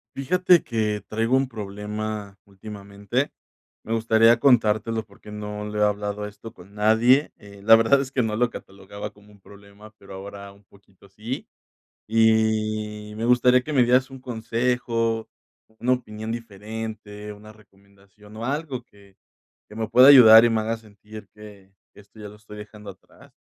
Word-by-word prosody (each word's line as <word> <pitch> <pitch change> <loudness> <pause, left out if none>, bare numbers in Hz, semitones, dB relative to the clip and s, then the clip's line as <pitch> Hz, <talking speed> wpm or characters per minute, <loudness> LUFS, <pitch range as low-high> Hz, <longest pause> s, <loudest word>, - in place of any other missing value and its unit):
Fíjate 180 +5 +3
que 110 -3 -2
traigo 115 +4 0
un 135 0 0
problema 105 -1 -6
últimamente. 100 +5 -5 0.5
Me 115 - -4
gustaría 115 +1 +4
contártelo 115 -3 +2
porque, 105 0 -16
no 105 0 -6
lo 105 0 -5
he - - +3
hablado 105 0 -3
esto 105 +2 -12
con 95 +3 -17
nadie, 115 +7 +3
eh, 100 -1 -15
la 115 +2 +8
verdad 115 +5 +3
es 135 -1 -7
que 130 - 0
no 110 -1 -2
lo 120 +2 +1
catalogaba 100 0 -10
como 105 0 -21
un 100 - -20
problema, 100 +2 -16
pero 100 -1 -14
ahora 100 +1 -10
un 100 +1 -22
poquito 100 0 -23
sí, 110 +6 -7 0.6
y 110 -1 0
me 115 - -3
gustaría 125 +1 +4
que 150 - -6
me 130 -3 +4
dieras 125 +2 +2
un 135 -1 -11
consejo, 115 -1 -2 0.5
una 125 +2 +2
opinión 110 -3 -6
diferente, 105 -1 -8
una 105 +1 -14
recomendación 100 0 -21
o 115 - -5
algo 140 -2 -4
que 100 -4 -23 0.5
que 105 - -13
me 110 -1 -3
pueda 125 +4 +7
ayudar 115 -5 +9
y 120 - +3
me 110 -1 0
haga 115 +1 -2
sentir 105 -1 -14
que 100 -2 -15 0.2
esto 105 +2 -19
ya 105 - -8
lo 105 - -13
estoy 105 0 -13
dejando 105 -1 -11
atrás. 95 0 -19
110 Hz, 165 wpm, -23 LUFS, 105-115 Hz, 0.6 s, ayudar